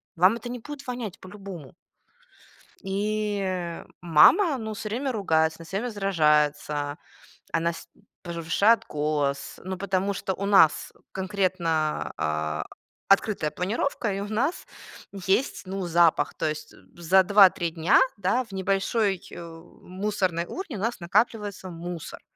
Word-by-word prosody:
Вам 185 +6 +5
это 240 - -8
не 245 - -5
будет 285 +2 -9
вонять 240 -6 -5
по-любому. 185 -7 -10 1.1
И, 210 +1 -1
э, 180 -3 -4 0.2
мама, 265 - +5
ну, 220 -2 -5
всё 215 +1 -6
время 260 +5 -2
ругается, 160 -7 +1
она 165 - -10
всё 190 +4 -4
время 240 +4 -3
сражается, 150 -6 +1 0.6
она 165 +1 +1
с 170 - -11 0.4
повышает 170 +7 +2
голос, 145 -2 -2
ну, 190 +1 -4
потому 195 +1 -1
что 190 - -2
у 200 +2 -4
нас 195 -6 +4 0.2
конкретно, 185 -5 -1
а, 75 0 -2 0.4
открытая 195 -5 +2
планировка, 210 - -2
и 195 - -3
у 200 - -5
нас 255 - -1 0.5
есть, 195 +3 0
ну, 190 -1 -4
запах. 165 -3 +3
То - - -1
есть 155 0 -6 0.2
за 175 +3 +4
2-3 190 -3 +5
дня, 165 +4 +3 0.2
да, 200 +6 +1
в 225 - -18
небольшой, 195 +1 0
э, 170 - -8 0.4
мусорной 185 -3 -1
урне 335 - -6
у 190 - -6
нас 230 +1 -2
накапливается 205 +1 0
мусор. 170 -1 -7
190 Hz, 135 wpm, -26 LUFS, 165-210 Hz, 1.1 s, Вам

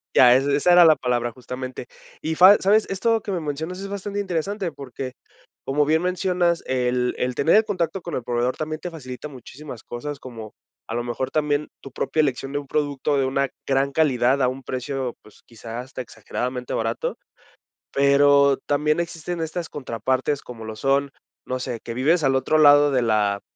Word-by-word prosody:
ya, 125 -1 +8
esa 135 +2 +2
esa 145 +5 +3
era 175 -1 +8
la 160 -1 +7
palabra 120 -1 -1
justamente, 125 0 -7 0.3
y 160 +1 -2
fa 185 +5 +8
¿sabes?, 210 +3 +3
esto 225 +4 +1
que 200 - -5
me 180 - -1
mencionas 160 +4 -4
es 195 - -5
bastante 200 0 -4
interesante, 190 0 -2
porque 135 -2 -7 0.5
como 145 +2 +1
bien 160 +2 +2
mencionas, 180 -1 +1
el 125 -1 0
el 125 0 -1
tener 160 +9 +3
el 220 - +6
contacto 185 -3 -2
con 170 -1 -5
el 125 - -3
proveedor 120 +1 -1
también 155 0 -4
te 180 - -5
facilita 130 -3 -8
muchísimas 130 -1 -10
cosas, 140 +4 -6
como 115 -5 -9 0.4
a 115 - -3
lo 120 - -1
mejor, 120 +2 -3
también 150 -1 0
tu 135 - -10
propia - - -2
elección 135 -2 0
de 145 - -1
un 145 - -10
producto 145 0 0
de 135 - +2
una 135 +1 0 0.2
gran 135 0 +1
calidad 135 -3 +2
a 125 - +3
un 130 +1 -7
precio, 130 0 -4
pues, 105 - -19
quizá 115 0 -8
hasta 130 +1 -7
exageradamente 125 +2 -5
barato, 115 +1 -2 0.8
pero 140 0 +4
también 150 +3 +1
existen 170 0 -5
estas 165 +1 -3
contrapartes, 130 +1 -2
como 115 -2 -10
lo 110 0 -7
son, 140 +2 +1 0.3
no 130 0 -3
sé, 120 -2 -4
que 115 - -5
vives 155 +7 +2
al 135 -1 +3
otro 145 +4 +2
lado 145 -1 +7
de 130 -2 +2
la 105 -3 +1
140 Hz, 190 wpm, -23 LUFS, 125-160 Hz, 0.8 s, ya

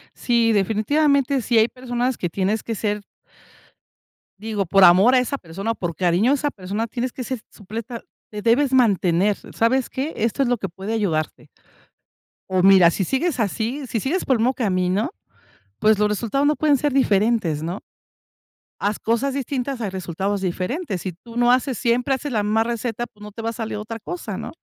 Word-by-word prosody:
Sí, 235 -2 +2
definitivamente 270 +7 +2
si 230 +1 +1
hay 220 +1 +5
personas 250 0 -2
que 175 - -2
tienes 200 +5 -1
que 225 - -3
ser 210 0 -2 1.4
digo, 210 -2 -2
por 195 +2 +4
amor 185 +8 +7
a 255 - +6
esa 275 +3 -1
persona, 195 +5 -4
o - - -3
por 170 -5 -4
cariño 185 +8 +2
a - - +4
esa 290 +1 -1
persona, 205 +3 -4
tienes 245 +2 -3
que 255 - -5
ser 255 +1 -4
supleta 225 +3 -7 0.3
te 210 0 -6
debes 260 +4 +2
mantener 200 -5 +3 0.2
¿sabes 245 +3 +1
qué? 280 +5 -3
Esto 230 +4 0
es 250 - +2
lo 245 - +2
que 195 - -4
puede 190 +5 -6
ayudarte. 165 -8 -2 1.0
O 185 -1 +2
mira, 185 -3 +7
si 195 - -1
sigues 270 - -1
así, 235 +6 -2
si 225 - -2
sigues 325 - -1
por 260 - +3
el - - -2
mismo 245 +4 +2
camino, 190 -4 0 0.7
pues 215 -1 +4
los 210 0 +3
resultados 235 +7 0
no 300 0 +3
pueden 300 -2 +3
ser 290 +1 -1
diferentes, 205 - +2
¿no?, 175 +5 -4 1.0
haz 205 +1 -1
cosas 240 +4 0
distintas 270 -1 -3
hay 210 - -2
resultados 190 +2 -3
diferentes, 190 - -3
si 185 - -4
tú 230 +7 -15
no 240 0 +4
haces 255 -2 +1
siempre, 245 +2 +1
haces 275 +1 -3
la 210 -3 0
misma 220 +2 +2
receta, 235 0 -3
pues 210 -2 -18
no 210 - -9
te 225 - -8
va 225 - -2
a - - -4
salir 220 -2 -4
otra 225 +2 -6
cosa, 355 +10 -6
¿no?, - - -6
225 Hz, 190 wpm, -22 LUFS, 195-255 Hz, 1.4 s, amor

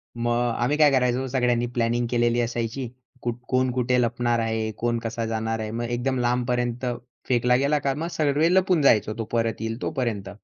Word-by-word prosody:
मग 120 0 0
आम्ही 140 +5 +1
काय 150 -2 +6
करायचो 130 0 +1
सगळ्यांनी 120 -2 +1
प्लॅनिंग 120 0 +1
केलेली 120 0 +2
असायची, 120 +2 -3 0.3
कुठ 120 -1 -2
कोण 130 0 +2
कुठे 125 0 +1
लपणार 120 0 0
आहे? 110 -1 -1
कोण 120 0 0
कसा 115 0 -3
जाणार 115 0 -2
आहे? 110 0 -4
मग 120 +1 -3
एकदम 125 +2 -1
लांबपर्यंत 125 0 0 0.4
फेकला 125 0 +3
गेला 140 +3 +2
का? 135 -1 0
मग 160 +4 -3
सगळे 155 +3 +2
लपून 185 -4 +3
जायचो, 110 -5 +4
तो 115 - -2
परत 115 -1 -1
येईल 115 +2 -4
तोपर्यंत. 110 -7 -2
120 Hz, 180 wpm, -24 LUFS, 115-130 Hz, 0.4 s, काय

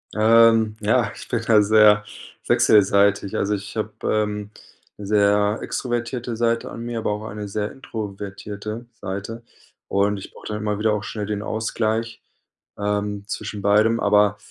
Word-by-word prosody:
Ähm, 110 0 +5
ja, 110 0 +1
ich - - -10
bin 120 - -1
da 110 -2 +5
sehr 105 0 +5 0.4
wechselseitig. 100 -1 +3
Also, 105 +1 0
ich 100 +1 -8
habe, 110 -1 -2
ähm, 105 -1 -1 0.5
sehr 105 +1 +2
extrovertierte 120 -1 -3
Seite 115 0 0
an 115 - -7
mir, 120 -1 -4
aber 105 - -1
auch 105 +1 -4
eine 105 -1 -6
sehr 105 +1 -3
introvertierte 105 -1 -7
Seite 105 +3 -6 0.4
und 100 +1 +1
ich 95 - -10
brauche - - -11
dann 105 - -3
immer 105 -1 -2
wieder 110 0 +2
auch 105 -1 -2
schnell 105 -1 -5
den 105 0 -3
Ausgleich, 110 +1 -2 0.6
ähm, 105 0 -2
zwischen 105 0 -5
beidem, 110 +3 +3
aber, 105 0 +3
105 Hz, 150 wpm, -22 LUFS, 105-110 Hz, 0.6 s, Ähm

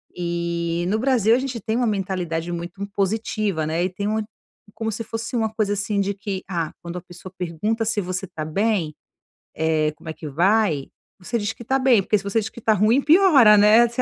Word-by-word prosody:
E 170 -1 -2
no 205 +4 +1
Brasil 235 -3 +3
a 255 - +1
gente 260 -3 -4
tem 220 +3 -2
uma 245 - +1
mentalidade 180 -5 -2
muito 175 +3 -6
impositiva, 200 -3 -1
né, 160 +3 -1
e 185 - 0
tem 200 +3 -4
uma 215 +1 0 0.5
como 225 -1 -3
se 220 - -5
fosse 225 +2 -5
uma 220 -2 +1
coisa 210 -2 0
assim, 200 0 -1
de 200 +1 -1
que: 195 -1 -5
"Ah, 165 -4 -2
quando 170 +1 -6
a - - -6
pessoa 180 +2 -12
pergunta 210 +7 -2
se 215 -1 0
você 185 +1 -4
tá 155 - -6
bem, 180 0 0 0.6
eh, 155 -1 +1
como 160 - -11
é - - -3
que 155 - -9
vai, 170 -1 +2 0.3
você 195 +6 -3
diz 205 0 -2
que - - -11
está 265 +4 +1
bem, 255 -5 +4
porque 210 - +2
se 195 - -7
você 200 +3 0
diz 220 0 -4
que - - -12
está 220 -1 +2
ruim, 215 +6 +3
piora, 300 - +6
né. 215 +3 +6
Você 235 +2 -2
200 Hz, 220 wpm, -22 LUFS, 175-225 Hz, 0.6 s, piora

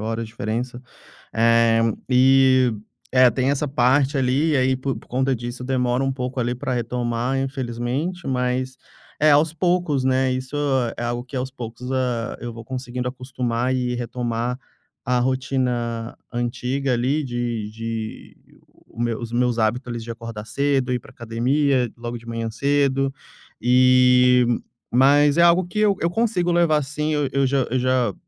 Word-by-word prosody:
horas 115 +1 -3
diferença. 115 +3 -4 0.5
Eh, 115 0 +4 0.3
e 130 -1 +5 0.4
é, 130 -1 +6
tem 130 0 0
essa 140 +1 0
parte 135 +2 +2
ali 135 +5 +2
e 145 - +2
aí, 130 0 +2
por 130 0 -3
por - - -14
conta 130 +2 0
disso, 120 +1 -6
demora 125 0 0
um 135 - 0
pouco 130 0 -4
ali 120 0 0
para 130 +1 -3
retomar, 120 +1 -1
infelizmente, 135 +6 -3
mas 130 0 -1 0.4
É 155 0 +5
aos 150 +2 +4
poucos, 170 -4 0
né, 130 0 +2
isso 130 +2 -4 0.4
é - - -5
algo 120 0 -2
que, 130 +2 -10
aos 130 +1 -2
poucos, 125 0 -7
ah, 125 -3 -1
eu 120 -1 -6
vou 115 0 -9
conseguindo 125 0 -4
acostumar 125 -1 -2
e 125 -1 -1
retomar 120 0 -3 0.4
a 125 0 +1
rotina 125 -3 -1 0.2
antiga 125 +3 -2
ali 130 +6 0
de 120 -4 -3
de 115 0 -6 0.3
O - - -31 0.2
o - - -8
meu 120 -2 -1
os 120 -2 -6
meus 120 0 +1
hábitos, 120 +4 0
ali, 120 - -4
de 115 +1 -7
acordar 115 -2 -7
cedo, 135 0 0
ir 125 - -1
pra - - -16
academia 125 +3 0
logo 120 0 -5
de 115 - -15
manhã 115 -1 -3
cedo, 135 +2 +1 0.5
e 125 0 +5 0.5
Mas 145 +4 +4
é - - +5
algo 170 +1 +5
que 195 +4 -4
eu 210 -2 +3
eu 170 - +1
consigo 185 -4 +1
levar 165 -3 +3
sim. 150 +3 -3
Eu 145 -2 +1
eu 140 -1 +2
já 135 -1 +1
eu 130 - +1
já 125 -4 +1
125 Hz, 165 wpm, -22 LUFS, 120-135 Hz, 0.5 s, é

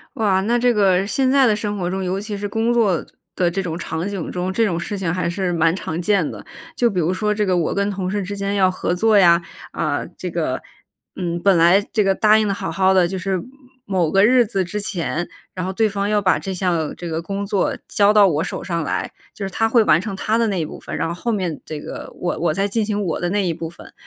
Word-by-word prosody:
哇， 200 -6 +2
那 235 +4 +1
这 245 0 +3
个 195 -2 +3
现 260 +4 +1
在 270 -2 +5
的 215 - +3
生 210 -1 -3
活 175 -2 -2
中， 190 +1 -2
尤 185 +1 -1
其 210 0 -5
是 205 - -5
工 225 +3 +1
作 205 -8 +2 0.3
的 175 -2 +2
这 195 +3 -2
种 170 -1 -4
场 160 +2 -3
景 195 -5 -4
中， 180 +1 -2
这 225 +4 +2
种 175 -6 -1
事 200 +4 -4
情 180 -4 -1
还 175 -1 -1
是 180 0 -1
蛮 165 0 +3
常 165 -3 -4
见 195 -3 +1
的。 - - -9 0.3
就 240 -5 +3
比 185 -5 -2
如 170 +2 +1
说 210 +2 0
这 210 0 0
个 185 -2 +1
我 170 -2 0
跟 200 0 0
同 190 -2 -3
事 205 - -1
之 200 +2 -5
间 200 0 -2
要 190 -2 +4
合 185 -1 -2
作 215 +3 +3
呀， 170 -2 +6 0.3
啊， - - -2
这 - - -4
个 - - -2 0.5
嗯， 170 -2 -3
本 195 -3 +4
来 170 +4 +6
这 215 - +3
个 195 0 +3
答 215 +2 +4
应 220 - +2
得 200 - 0
好 195 - -4
好 190 0 +2
儿 - - +4
的， 185 -2 +4
就 190 +2 -4
是 185 -1 -2 0.4
某 180 -5 0
个 195 +1 +5
日 245 +1 +5
子 195 -4 -1
之 210 +4 -4
前， 175 -3 -3 0.2
然 185 -1 -4
后 190 - -2
对 220 +3 +2
方 200 0 -2
要 210 -1 +2
把 190 -2 +3
这 195 - -5
项 175 -4 -1
这 175 - -6
个 165 0 -2
工 200 +3 -4
作 200 -1 0
交 205 0 +3
到 210 -2 +7
我 160 -2 0
手 - - -5
上 170 -3 -2
来， - - -2 0.2
就 200 - -5
是 195 - -3
他 225 +4 +1
会 230 0 +5
完 155 - +5
成 205 +1 -5
他 215 +3 0
的 230 -1 +2
那 195 -3 -1
一 160 - -1
部 - - -8
分， - - -7
然 - - -1
后 165 - -3
后 230 +7 -3
面 185 -7 -2
这 155 -1 -6
个， - - -8
我 175 - -2
我 165 -1 +1
再 195 +4 0
进 215 +1 0
行 210 -1 -1
我 170 -5 -2
的 175 - 0
那 200 0 0
一 170 - 0
部 165 0 -6
分。 170 - -14
190 Hz, 290 characters per minute, -20 LUFS, 175-210 Hz, 0.5 s, 到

